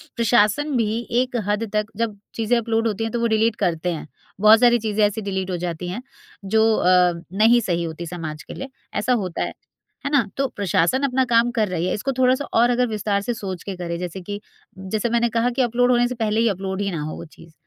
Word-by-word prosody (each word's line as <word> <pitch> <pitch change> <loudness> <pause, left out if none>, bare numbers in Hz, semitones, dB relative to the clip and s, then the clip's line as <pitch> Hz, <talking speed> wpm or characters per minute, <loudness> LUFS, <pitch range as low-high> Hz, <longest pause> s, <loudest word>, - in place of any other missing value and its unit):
प्रशासन 235 +5 +2
भी 225 0 0 0.2
एक 255 -1 -4
हद 210 +1 -1
तक 210 0 +1
जब 225 -3 -2 0.2
चीज़ें 230 +1 +1
अपलोड 225 0 0
होती 215 +1 -2
हैं 225 - -2
तो 235 - 0
वो 235 - +2
डिलीट 220 0 +2
करते 175 -1 0
हैं। 155 -1 -7 0.3
बहुत 215 +2 +7
सारी 240 -1 +5
चीज़ें 215 -1 +1
ऐसी 210 +2 -1
डिलीट 190 -2 -3
हो 180 - -1
जाती 175 0 -4
हैं 200 +7 -4 0.4
जो 220 +3 +3
अ, 180 -2 +4 0.2
नहीं 235 +2 +5
सही 175 -4 -1
होती 165 +1 -5
समाज 155 -3 -6
के - - -9
लिए। 270 - -7 0.2
ऐसा 230 +5 +1
होता 180 -2 -4
है। - - -4 0.5
है 280 - 0
ना? 270 -8 +3
तो 275 0 +1
प्रशासन 200 +5 0
अपना 260 -1 +2
काम 235 0 +3
कर 225 -3 +1
रही 180 -2 -2
है - - 0
इसको 265 +6 -2
थोड़ा 255 0 +4
सा 285 - -5
और 240 +2 +4
अगर 245 0 +2
विस्तार 210 -2 -1
से 240 +4 -2
सोच 190 -5 -6
के 195 - -5
करें। 170 -1 -4
जैसे 180 +1 -5
कि 205 +3 -6 0.4
जैसे 210 +5 -2
मैंने 235 0 +2
कहा 230 +2 +1
कि 250 +2 0
अपलोड 245 +1 +2
होने 245 0 +3
से 250 - -5
पहले 220 -2 0
ही 230 - +3
अपलोड 190 0 -3
ही 200 - -1
ना 165 -4 -3
हो 155 +1 -4
वो - - -8
चीज़। 165 0 -17
215 Hz, 240 wpm, -22 LUFS, 185-235 Hz, 0.5 s, बहुत